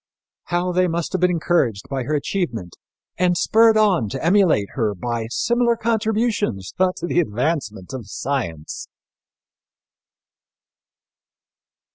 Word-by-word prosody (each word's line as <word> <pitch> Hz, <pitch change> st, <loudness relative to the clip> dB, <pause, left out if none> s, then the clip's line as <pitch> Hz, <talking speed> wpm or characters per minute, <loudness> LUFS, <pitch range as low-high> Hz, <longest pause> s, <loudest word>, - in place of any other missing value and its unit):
How 175 Hz, +1 st, -1 dB
they 180 Hz, +1 st, +2 dB
must 170 Hz, -1 st, -2 dB
have 185 Hz, -, -2 dB
been 180 Hz, -, +4 dB
encouraged 160 Hz, -, 0 dB
by 135 Hz, -3 st, -3 dB
her 150 Hz, -, 0 dB
achievement 135 Hz, -, -3 dB, 0.4 s
and 180 Hz, -1 st, +2 dB
spurred 225 Hz, +4 st, +4 dB
on 190 Hz, -, +3 dB
to 135 Hz, +5 st, -4 dB
emulate 170 Hz, -, +3 dB
her 110 Hz, -5 st, -1 dB
by 115 Hz, +4 st, -3 dB
similar 235 Hz, -, +1 dB
contributions 220 Hz, -, -1 dB
to 185 Hz, -2 st, +1 dB
the 175 Hz, -, +1 dB
advancement 120 Hz, -, -2 dB
of 125 Hz, -6 st, -6 dB
science! 100 Hz, -, -4 dB
170 Hz, 115 wpm, -21 LUFS, 115-185 Hz, 0.4 s, been